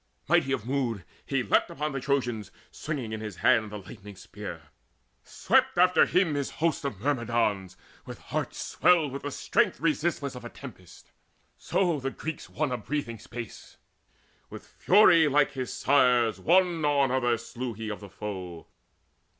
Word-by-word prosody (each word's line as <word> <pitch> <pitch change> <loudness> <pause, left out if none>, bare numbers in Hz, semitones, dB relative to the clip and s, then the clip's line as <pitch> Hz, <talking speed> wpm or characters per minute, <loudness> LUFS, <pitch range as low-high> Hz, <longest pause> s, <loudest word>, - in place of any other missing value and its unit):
Mighty 135 - +3
of 120 -5 -2
mood 120 -8 -2 0.2
he 135 -2 -1
leapt 100 - +2
Upon 150 +2 -3
the 135 - -3
Trojans, 125 -6 -1 0.2
swinging 135 -8 -5
in 110 - -5
his 105 -3 -6
hand 115 -3 +2
The 105 - -5
lightening 100 +1 -11
spear: - - -9 0.5
swept - - +1
after 180 +1 +5
him 180 -4 +2
his 140 -1 -2
host 160 -2 -1
Of 135 -9 -4
Myrmidons 115 -7 -1 0.3
with - - -9
hearts - - -4
swelled 165 -6 +2
with 140 - -6
the 145 - -4
strength 140 - 0
Resistless 155 -2 -1
of 125 - -9
a 120 - -7
tempest; 100 -11 -13 0.4
so 175 -6 0
the 135 0 -2
Greeks 155 +3 -7
Won 145 -5 -1
breathing 120 -3 -4
space. 115 0 -9 0.7
With - - -10
fury 175 -5 +5
like 145 0 +3
his 130 -3 -5
sire's 125 -6 +3
One 175 - +3
after 140 -3 +2
other 120 -2 +1
slew 120 +1 -6
he 110 0 -5
of 105 - -6
the 100 - -11
foe. 95 -4 -7
130 Hz, 160 wpm, -27 LUFS, 110-145 Hz, 0.7 s, after